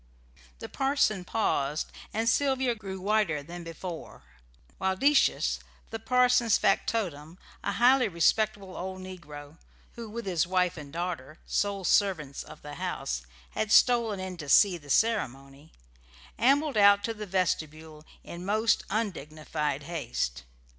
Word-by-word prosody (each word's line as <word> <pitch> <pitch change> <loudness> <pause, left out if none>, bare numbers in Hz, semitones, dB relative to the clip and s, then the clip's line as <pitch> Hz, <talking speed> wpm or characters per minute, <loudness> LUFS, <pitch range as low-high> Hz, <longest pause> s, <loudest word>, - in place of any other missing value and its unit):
The - - -7
parson 270 -8 +1
paused, 155 -8 -1 0.2
and 225 +2 -1
Sylvia 265 0 +2
grew 195 -4 -7
whiter 195 -7 +1
than 175 +3 -9
before; 165 0 -8 0.6
while 190 0 0
Decius, 280 +7 +3 0.3
the 225 - -4
parson's 250 -1 +3
factotum, 175 -6 -1 0.3
a 200 - -1
highly 245 +4 +4
respectable 195 +2 +1
old 185 +1 -5
negro 155 -5 -10 0.3
(who, 230 -2 -9
with 235 +1 -6
his 180 -3 0
wife 180 -1 +1
and 145 -3 -9
daughter, 165 -4 -5
sole 200 -1 -1
servants 175 -8 +1
of - - -13
the 145 0 -8
house, 60 0 -3 0.2
had 215 -1 -2
stolen 230 -5 +4
in 185 -1 -5
to 145 -4 -7
see 195 +5 +6
the 145 -2 -16
ceremony), 140 - -1 0.7
ambled 280 +1 +3
out 200 0 +6
to 225 - -2
the 210 -1 -7
vestibule 160 -4 -2 0.2
in 170 +1 -8
most 215 +3 +2
undignified 155 -8 -3
haste. 65 - -3
185 Hz, 135 wpm, -28 LUFS, 155-220 Hz, 0.7 s, see